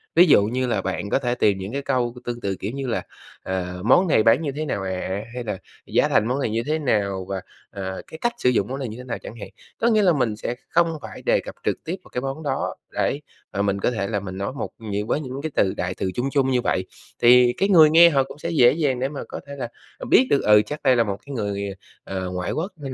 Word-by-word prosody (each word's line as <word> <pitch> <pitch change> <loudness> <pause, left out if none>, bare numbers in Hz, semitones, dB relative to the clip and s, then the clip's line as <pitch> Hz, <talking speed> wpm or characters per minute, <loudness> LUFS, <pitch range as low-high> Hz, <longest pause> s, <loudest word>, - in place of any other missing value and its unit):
Ví 175 - +8
dụ 100 -9 +6
như 125 +4 -1
là 105 -5 0
bạn 95 +2 -3
có - - +2
thể 125 -2 -1
tìm 105 -5 +2
những 95 +5 -6
cái 140 - -2
câu 125 -3 -1
tương 120 0 -4
tự, 100 -3 -1
kiểu 100 - -5
như 135 0 -4
là, 115 - -1 0.4
ờ, 90 -1 -3
"Món 180 +11 +5
này 110 -9 +4
bán 115 +6 +5
như 150 -3 -2
thế 155 - -2
nào 100 -9 -2
ạ?" 95 +2 -3
hay 125 -1 -4
là 105 -4 -3 0.3
"Giá - - +2
thành 110 - +3
món 130 +3 0
này 125 - 0
như 115 +2 -1
thế 155 +2 0
nào?" 100 -9 0
và, 95 -1 -3 0.3
à, 95 -1 -5
"Cái 160 - -9
cách 240 0 +1
sử 125 - +2
dụng 105 -5 +1
món 135 +2 -4
này 130 - -3
như 110 - -7
thế 125 - -8
nào?" 125 -2 -4
chẳng - - -9
hạn. - - -7 0.3
Có 230 - +1
nghĩa 215 -2 +4
là 185 -4 +4
mình 125 -7 0
sẽ 120 +3 -4
không 165 -1 +2
phải - - -9
đề - - +2
cập - - -8
trực - - -1
tiếp 170 +3 -3
vào - - -17
cái 125 - -3
món 135 +4 -4
đó 135 -2 -2 0.2
để 140 - 0 0.3
mà 100 - 0
mình 100 -1 0
có 110 - +1
thể 105 -5 -2
là 105 -2 -1
mình 95 -1 -7
nói 100 +5 -3
một 140 - -4
những 105 -1 -3
với - - +1
những 135 -1 -6
cái 160 +1 -4
từ 95 - +2
đại 90 +1 -2
từ 95 - -2
chung 125 +3 -1
chung 135 -2 +2
như 125 -1 +2
vậy, 95 -4 0 0.4
thì 120 0 +7
cái 195 - +1
người 160 -5 +8
nghe 170 +2 +8
họ 135 -3 +3
cũng 135 - -11
sẽ 170 - -3
dễ 125 -7 +6
dàng 145 -6 0
để 135 +2 0
mà 145 - -6
có - - -6
thể 140 - -7
là, 130 -3 -4 0.3
à, - - -6
biết 260 - +6
được, 140 - +3
ừ, 105 0 +6
chắc 150 0 -6
đây 130 -2 +5
là 115 - +4
một 100 -3 -3
cái 140 - -7
người, 100 -2 -2 0.4
à, 95 - -4
ngoại 90 -1 -3
quốc 175 +6 -2
nên 140 -3 -6
125 Hz, 285 wpm, -23 LUFS, 100-140 Hz, 0.4 s, Ví